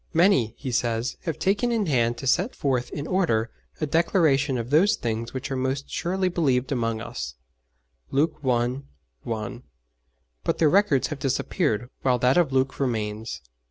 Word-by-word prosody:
'Many,' 160 - +4
he 130 -2 -5
says, 115 0 0
'have 165 -4 -2
taken 205 +5 +1
in 225 -3 +1
hand 120 -6 +1
to 135 - -7
set 180 - +1
forth 130 -3 0
in 145 - -5
order 155 -12 +1 0.3
a 155 - 0
declaration 150 -4 +2
of 120 +2 -4
those 175 +8 +5
things 115 0 -3
which 135 +2 -5
are - - 0
most 130 +2 -2
surely 185 +2 0
believed 135 -8 +1
among 115 -4 0
us' 70 - -6 0.7
(Luke 145 +4 +1
i. 125 0 +1 0.4
1), 115 - -5 0.8
but - - 0
their 155 -3 +4
records 195 -9 +3
have 150 -3 -5
disappeared, 125 -3 0
while 125 -2 +2
that 125 +2 +3
of 170 -6 +3
Luke 135 0 0
remains. 110 - -2
135 Hz, 160 wpm, -25 LUFS, 120-160 Hz, 0.8 s, those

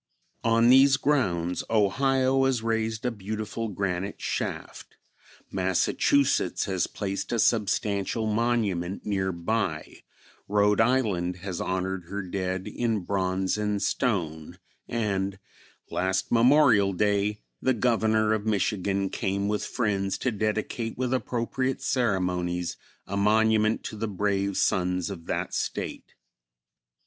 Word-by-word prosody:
On 115 +1 +4
these 135 +1 +7
grounds 95 - 0
Ohio 130 +5 +2
has 130 -4 +1
raised 115 0 -1
a 125 - +1
beautiful 110 +2 -4
granite 100 -1 -3
shaft, - - -4 0.5
Massachusetts 95 +2 +1
has 95 -3 0
placed 100 -1 -4
a 120 - +1
substantial 105 0 +1
monument 105 -5 0
near 95 -2 0
by, 85 -2 -3 0.5
Rhode 105 +1 +3
Island 105 -8 +1
has 95 -3 -3
honored 95 -1 -2
her 100 +3 -5
dead 95 0 -3
in 115 -4 -1
bronze 95 +1 -1
and 105 -1 0
stone, 85 - -1 0.3
and 100 -4 -1 0.5
last 95 +1 -1
Memorial 120 -5 +5
Day 105 +2 +1 0.2
the 130 -1 +2
Governor 110 -2 +2
of 110 -1 -1
Michigan 100 -1 0
came 100 +1 -1
with 105 0 -1
friends 100 -5 -1
to 125 - -1
dedicate 110 +2 -2
with 125 0 -1
appropriate 130 +1 -1
ceremonies 90 -8 0 0.3
a 100 - -5
monument 110 +1 +3
to - - -6
the 110 +1 -3
brave 100 -1 -1
sons 90 +1 +1
of 85 -4 -9
that - - -2
State. - - -4
105 Hz, 120 wpm, -27 LUFS, 95-115 Hz, 0.5 s, these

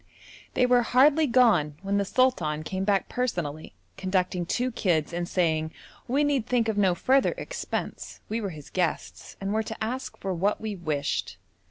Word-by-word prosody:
They 250 - +4
were 245 0 +4
hardly 285 +6 +4
gone 225 - +4
when 200 +1 0
the 200 - 0
sultan 175 -12 +1
came 190 +4 -3
back 195 -1 +1
personally 170 - -3 0.2
conducting 185 -2 -1
two 250 +6 0
kids 170 -8 0
and 175 0 -2
saying 160 -3 +1 0.4
we 275 +4 +2
need 280 -5 +1
think 240 -2 +1
of 220 - 0
no 190 -3 +3
further 265 +9 +2
expense; - - -5
we 225 +2 -2
were 200 - -2
his 155 -5 -11
guests 180 -3 -3
and 195 +1 -2
were 220 - +2
to 220 0 -6
ask 255 +4 -4
for 190 -1 -3
what 195 +4 0
we 215 -2 -4
wished. 155 -5 -2
200 Hz, 175 wpm, -27 LUFS, 175-245 Hz, 0.4 s, They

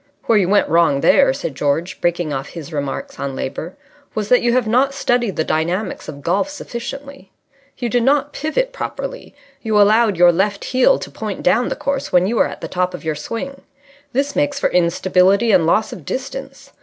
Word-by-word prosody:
"Where 225 -2 +3
you 185 -2 +1
went 205 +1 +3
wrong 160 -3 +3
there," 275 -1 +5
said 265 - -4
George, 150 +7 -2
breaking 175 -3 0
off 135 +1 -4
his 165 -1 -9
remarks 140 -2 -4
on 140 -1 -3
Labour, 160 +7 -5 0.4
"was 210 -1 -2
that 250 - +5
you 240 - +2
have 255 -1 +2
not 260 +5 +2
studied 245 -6 0
the 160 - 0
dynamics 175 +6 -2
of 140 -1 -9
golf 195 - 0
sufficiently. 275 -4 -8 0.5
You 245 - -2
did 245 +1 +1
not 285 +3 +2
pivot - - -1
properly. - - -6 0.3
You 215 -2 +1
allowed 210 -1 +4
your 175 0 +7
left 200 +3 0
heel 260 - +3
to - - -8
point - - -5
down - - +2
the - - -2
course 280 0 -3
when 180 0 +4
you 225 +4 -1
were - - +4
at - - -9
the - - -4
top 180 0 -1
of - - -10
your 160 - 0
swing. 230 - -6 0.5
This 275 +3 -1
makes 290 0 0
for - - +1
instability 185 +5 +3
and 175 -5 +4
loss 215 +6 +1
of 170 - -10
distance. 265 - -6
210 Hz, 200 wpm, -19 LUFS, 175-265 Hz, 0.5 s, your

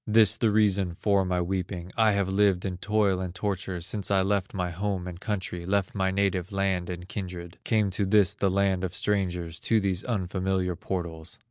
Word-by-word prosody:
This 110 -1 +6
the 115 - +2
reason 100 -4 +2
for 100 +1 +2
my 90 -1 0
weeping; 90 0 -3
I 110 -2 +4
have 100 -1 +1
lived 95 -1 +2
in 90 -2 -3
toil 105 -1 +1
and 90 -1 -5
torture, 95 -2 -3
Since 95 +2 -2
I 95 -1 +3
left 100 -1 0
my 90 -2 -1
home 95 +1 -2
and 90 -1 -7
country, 95 -5 -3
Left 95 +1 0
my 95 -1 +1
native 95 -1 0
land 95 -2 0
and 90 0 -6
kindred, 90 -4 -6
Came 105 -4 +2
to 100 +1 0
this 100 -3 +4
the 100 - 0
land 95 -1 +1
of 90 -1 -3
strangers, 90 -5 -1
To 115 - +2
these 95 -2 -1
unfamiliar 95 -4 -1
portals. 85 -3 -5
95 Hz, 195 wpm, -27 LUFS, 90-100 Hz, -, This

